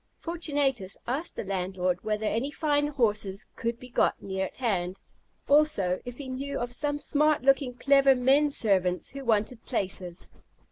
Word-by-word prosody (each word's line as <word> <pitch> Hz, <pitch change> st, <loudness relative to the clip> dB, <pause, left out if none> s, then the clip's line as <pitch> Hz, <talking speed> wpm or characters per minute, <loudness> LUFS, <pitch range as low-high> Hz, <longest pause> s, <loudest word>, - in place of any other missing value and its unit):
Fortunatus 285 Hz, -, -2 dB
asked 275 Hz, +8 st, -2 dB
the -, -, -4 dB
landlord 185 Hz, -2 st, -2 dB
whether 215 Hz, 0 st, -1 dB
any 230 Hz, +6 st, 0 dB
fine 290 Hz, 0 st, +1 dB
horses 215 Hz, -8 st, 0 dB
could 235 Hz, 0 st, -3 dB
be 250 Hz, -, -11 dB
got 245 Hz, -, +1 dB
near 190 Hz, 0 st, -3 dB
at -, -, -16 dB
hand; 190 Hz, -7 st, -1 dB, 0.5 s
also, 280 Hz, -12 st, +3 dB
if 245 Hz, 0 st, -7 dB
he 280 Hz, -, -7 dB
knew 275 Hz, +2 st, -4 dB
of 240 Hz, 0 st, -3 dB
some 290 Hz, +3 st, 0 dB
smart 300 Hz, 0 st, +2 dB
looking, 270 Hz, -2 st, +3 dB
clever 275 Hz, +1 st, +5 dB
men 270 Hz, +4 st, +4 dB
servants 190 Hz, -8 st, +1 dB
who 275 Hz, 0 st, -7 dB
wanted 225 Hz, 0 st, 0 dB
places. 185 Hz, -6 st, -4 dB
245 Hz, 155 wpm, -28 LUFS, 195-280 Hz, 0.5 s, clever